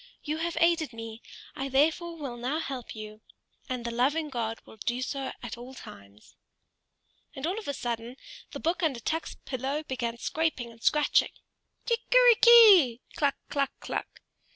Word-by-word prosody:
You 305 0 -2
have 335 +1 -3
aided 335 -5 +2
me, 225 0 -8 0.3
I 270 0 -4
therefore 325 +5 +1
will 275 -6 -5
now 250 +5 -2
help 270 -8 -5
you; 215 0 -9 0.5
and 250 -2 -4
the 235 - -2
loving 290 +6 +1
God 230 -2 -3
will - - -15
do 240 +4 -2
so 270 0 -3
at 235 0 -6
all 255 +2 -10
times." 100 - -14 1.0
And 270 +1 -4
all 375 +6 -1
of 435 - -10
a 285 - -1
sudden 235 0 -4 0.3
the - - -7
book 340 +3 -1
under 295 -8 0
Tuk's 320 +7 -3
pillow 270 +4 -3
began 240 -4 -3
scraping 300 -4 -2
and 230 0 -18
scratching. 300 +4 +3 0.6
"Kickery - - +5
ki! 400 - +8
kluk! 285 -4 +1 0.2
kluk! 280 -2 +1
kluk!" - - -6
270 Hz, 160 wpm, -28 LUFS, 235-320 Hz, 1.0 s, ki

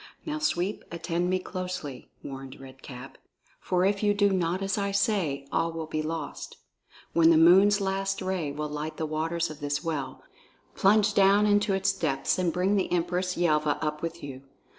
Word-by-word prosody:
"Now, 310 0 -3
Sweep, 200 - -1
attend 170 +1 -2
me 185 - +2
closely," 180 -7 -6
warned 135 -1 -8
Red 135 0 -13
Cap, 130 0 -10 0.4
"for 180 0 +1
if 200 0 +1
you 205 -1 +2
do 205 0 +3
not 180 0 0
as 195 -1 0
I 200 -1 -1
say, 195 -9 0
all 165 0 0
will 165 -1 -5
be 155 0 -3
lost. 160 +1 -5 0.6
When 165 -1 +5
the 165 - +6
moon's 190 +5 +6
last 195 0 -1
ray 185 -6 -2
will 150 +1 -4
light 150 +1 -5
the 160 - -2
waters 160 +2 -2
of 155 - -10
this 145 0 -2
well, 155 -4 -4 0.5
plunge 210 +1 +3
down 200 +1 +5
into 205 -1 +3
its 195 0 +1
depths 140 -5 -1
and 180 -2 +1
bring 185 +4 +1
the 190 - -1
Empress 180 +1 -1
Yelva 155 -3 +2
up 150 -1 -3
with 165 +1 -5
you. 135 -2 -7
170 Hz, 185 wpm, -27 LUFS, 155-195 Hz, 0.6 s, the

